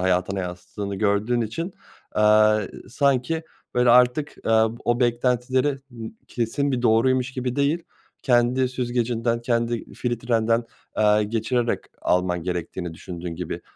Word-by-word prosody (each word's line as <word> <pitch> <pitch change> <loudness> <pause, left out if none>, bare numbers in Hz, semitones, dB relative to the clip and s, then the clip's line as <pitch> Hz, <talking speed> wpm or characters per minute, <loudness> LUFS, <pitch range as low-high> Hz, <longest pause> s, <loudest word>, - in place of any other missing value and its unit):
hayatına 95 +1 +1
yansıttığını 95 +3 -5
gördüğün 105 +4 +1
için, 165 - -3 0.4
aaa, 105 0 +5
s - - -10
sanki, 140 +4 +1 0.3
böyle, 125 0 +4
artık, 125 +4 +4
aaa, 110 0 +4 0.2
o 120 +1 +1
beklentileri 125 +3 +1
n 115 -2 -8 0.2
kesin 135 +4 -1
bir 125 -2 -1
doğruymuş 125 +2 +3
gibi 125 0 -3
değil 145 +5 +1 0.4
kendi 125 0 +3
süzgecinden 120 -2 -1
kendi 120 -1 -1
filtrenden, 115 -1 0 0.3
aaa, 105 0 +4
geçirerek 115 +3 0 0.2
alman 90 -1 +1
gerektiğini 90 -1 -4
düşündüğün 85 0 -7
gibi 90 +2 -5
120 Hz, 120 wpm, -24 LUFS, 105-125 Hz, 0.4 s, aaa